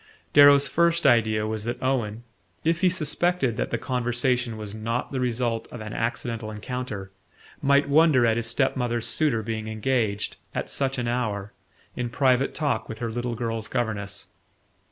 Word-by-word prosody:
Darrow's 145 -1 +7
first 170 +4 +2
idea 110 -2 +4
was 110 -1 -3
that 120 +1 -3
Owen, 120 -4 -1 0.4
if 165 +1 +1
he 185 - +5
suspected 175 -5 0
that - - -1
the - - -1
conversation 125 -1 0
was 105 -1 -6
not 115 +3 -3
the 135 - -2
result 120 -2 -1
of 120 - -7
an 110 -1 -7
accidental 115 -1 -3
encounter, 105 -3 -5 0.5
might 140 +1 +3
wonder 145 -4 +5
at 115 -1 +3
his 115 0 -1
step 130 +3 +1
mother's 120 -3 -1
suitor 135 -8 +1
being 110 0 -4
engaged, 110 -2 -1 0.2
at - - -3
such 135 -1 -1
an 120 -1 -2
hour, 105 -5 -2 0.4
in 125 -1 -2
private 130 +1 +2
talk 140 -8 -1
with 110 - -6
her 115 -1 -3
little 120 +1 -3
girl's 115 -1 -3
governess. 105 -5 -2
120 Hz, 165 wpm, -25 LUFS, 110-135 Hz, 0.5 s, Darrow's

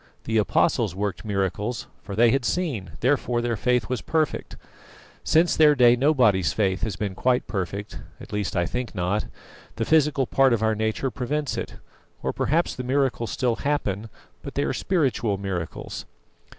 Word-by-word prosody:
The 110 -1 +1
Apostles 100 -3 +1
worked 100 +1 -3
miracles; 105 +3 -2 0.2
for 100 - -7
they 115 +2 +5
had 135 0 +1
seen, 130 - -2
therefore 125 -2 +1
their 120 -1 -1
faith 125 +3 +1
was 125 -2 -2
perfect. 155 -2 -1 0.7
Since 165 +2 +3
their 150 -2 +6
day 120 -2 +6
nobody's 125 - +3
faith 95 -3 0
has 110 -4 -2
been 100 0 -3
quite 125 +5 +1
perfect; 100 +1 -4 0.2
at - - -11
least 105 -2 -2
I 85 -1 +2
think 125 +4 -4
not. 90 +3 -1 0.5
The - - -1
physical 150 -3 +3
part 135 0 +3
of 110 -1 0
our 110 0 +3
nature 110 +4 -1
prevents 140 +5 -2
it. - - -5 0.5
Or - - -1
perhaps 165 +4 +1
the 125 - -5
miracles 130 -3 0
still 125 -3 0
happen, 115 -7 -2 0.3
but - - -8
they - - +1
are - - -1
spiritual 130 - 0
miracles." 95 -4 -5
120 Hz, 165 wpm, -24 LUFS, 100-135 Hz, 0.7 s, their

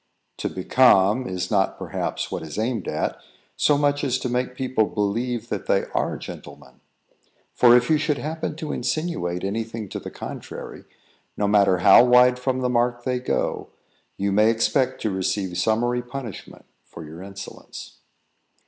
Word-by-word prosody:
To - - -2
"become" 105 +3 +3
is 90 0 -4
not, 100 -2 +1
perhaps, - - -4
what - - -3
is 80 +3 -8
aimed 115 +1 -2
at, - - -2 0.4
so 145 - +3
much 145 0 +1
as 130 -3 +1
to 125 - -4
make 125 +1 -2
people 130 -4 +1
believe 115 +3 -2
that 105 - -4
they 95 - +2
are - - -1
gentlemen; 65 - -11 0.7
for 120 0 +6
if 125 0 +1
you 155 -1 +3
should 150 -2 0
happen 160 0 -4
to 155 -2 -5
insinuate 125 - -2
any 105 +4 -1
thing 110 -2 -7
to - - -5
the - - -8
contrary, - - -8 0.5
no 105 - +1
matter 100 -2 +4
how - - +9
wide 125 0 +5
from 130 0 -1
the 125 - +1
mark 120 0 0
they 125 -1 -1
go, 125 - -2 0.5
you 100 0 -1
may 105 +3 +4
expect 120 +4 +1
to 110 - 0
receive 95 -1 -2
summary 120 +5 +1
punishment 125 -4 -9 0.2
for 80 - -11
your 80 +3 -10
insolence. 100 +1 -10
120 Hz, 165 wpm, -23 LUFS, 100-125 Hz, 0.7 s, how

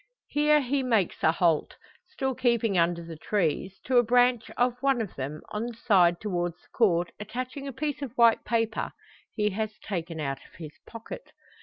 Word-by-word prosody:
Here 300 0 +4
he 275 +1 0
makes 225 -8 +1
a 160 - +5
halt, 165 -2 +1 0.3
still 270 -8 -2
keeping 235 -4 +1
under 170 0 +2
the 165 -1 -8
trees; 190 +1 -1
to 255 -1 +2
a - - +4
branch 245 0 +3
of 245 0 +1
one 275 -2 +2
of 220 -5 -3
them, 140 +3 -5
on 215 +3 -3
the 240 - -7
side 180 -7 +4
towards 175 -5 -2
the - - -27
Court 175 -7 +2
attaching 255 +6 -5
a - - -3
piece 290 +2 -3
of 260 -3 -6
white 235 -1 +5
paper, 225 -1 -1 0.4
he 210 -1 +1
has 215 +2 -3
taken 170 -5 -5
out 135 -2 -2
of - - -20
his 155 -3 -9
pocket. 230 - -9
220 Hz, 185 wpm, -27 LUFS, 175-250 Hz, 0.4 s, a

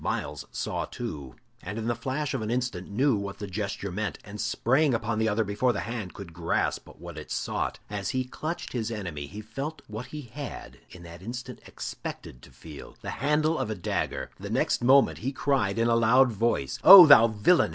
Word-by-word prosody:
Myles - - -3
saw - - -3
too, 70 -4 -7 0.3
and 100 +4 -6
in 110 - -4
the 120 - +1
flash 130 +5 -3
of - - -2
an 110 - -3
instant 120 -7 -2
knew 130 +5 +2
what 100 -1 -5
the 105 - -5
gesture 100 0 -4
meant, 105 +3 -3
and 105 0 -7
sprang 130 +5 +2
upon 115 -1 -2
the 110 0 +2
other 110 +2 +1
before 110 +5 0
the - - -3
hand 115 -6 -5
could 95 -4 -9
grasp 85 0 -1
what 85 -1 -9
it 75 - -11
sought. - - -2
As 100 -2 -4
he 130 0 -1
clutched 155 +6 -5
his 115 -3 -2
enemy 85 -10 -5
he 105 +8 -8
felt 135 +9 -6
what 110 +4 -7
he 150 +3 -7
had 135 +3 -8
in 90 - -13
that 85 +1 -11
instant 120 +5 -7
expected - - -7
to - - -15
feel 75 -3 -12
the - - -4
handle 150 +4 +1
of - - -2
a 110 - -2
dagger. 90 - -3
The - - -7
next - - 0
moment 135 +2 +5
he 135 - -2
cried, 130 -7 0
in 115 0 +2
a 115 - +3
loud 120 +3 +5
voice: 110 - -1
"Oh, 185 0 +12
thou 140 -6 +8
villain! 110 +11 +3
110 Hz, 205 wpm, -27 LUFS, 100-130 Hz, 0.3 s, Oh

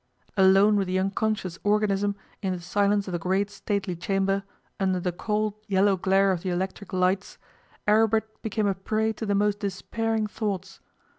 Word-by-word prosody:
Alone 195 +2 +5
with 195 -2 0
the 185 +1 0
unconscious 195 -1 -1
organism 205 -1 +1 0.3
in 190 -2 -1
the 180 - -4
silence 200 +3 +1
of - - -4
the 175 - -2
great 190 +4 0
stately 200 -2 -2
chamber, 195 +3 0 0.4
under 190 -2 +1
the 180 0 -1
cold 210 +3 -1
yellow 195 0 +3
glare 195 +1 +3
of 180 -3 -1
the 185 - -3
electric 190 +2 -3
lights, 185 +1 0 0.5
Aribert 220 +1 +2
became 215 -1 -1
a 200 - +2
prey 215 +4 -1
to 220 0 -5
the 200 - +2
most 205 0 +1
despairing 220 +3 -2
thoughts. 195 -3 -4
200 Hz, 165 wpm, -26 LUFS, 190-210 Hz, 0.5 s, Alone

